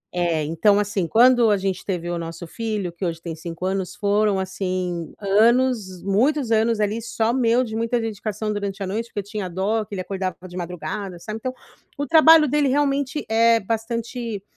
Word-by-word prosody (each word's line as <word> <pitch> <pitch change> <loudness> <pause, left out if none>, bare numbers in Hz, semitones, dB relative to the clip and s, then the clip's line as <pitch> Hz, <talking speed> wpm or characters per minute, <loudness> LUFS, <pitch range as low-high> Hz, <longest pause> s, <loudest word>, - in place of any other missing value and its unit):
É, 170 -3 +1
então, 165 +7 +3
assim, 205 -4 -1
quando 240 +1 +5
a 205 - +3
gente 190 -1 -2
teve 175 -3 -3
o 175 -1 -2
nosso 165 +1 -6
filho, 210 -1 -3
que 170 +3 -9
hoje 165 -2 -2
tem 165 -1 -6
5 165 +2 -6
anos 190 -1 -2
foram, 205 -1 +1
assim, 185 -3 -3
anos 215 -1 +2
muitos 240 +6 +1
anos, 225 0 +2
ali, 210 +2 0
só 225 0 -1
meu 245 -1 +3
de 220 -3 -5
muita 230 +2 0
dedicação 215 -1 -3
durante 200 -1 -4
a - - -2
noite 220 +5 -3
porque 210 - -5
eu 200 - -3
tinha 205 -2 -5
dó, 200 +5 0
que 205 -1 -8
ele 185 - -3
acordava 185 -2 -3
de 180 - -12
madrugada, 180 +2 -5
sabe, 215 +5 -6
então 255 +2 -3 0.4
o 285 - -2
trabalho 320 0 +7
dele 290 +1 +2
realmente 280 +1 0
é 230 +1 +4
bastante 230 0 -4
210 Hz, 190 wpm, -22 LUFS, 185-230 Hz, 0.4 s, trabalho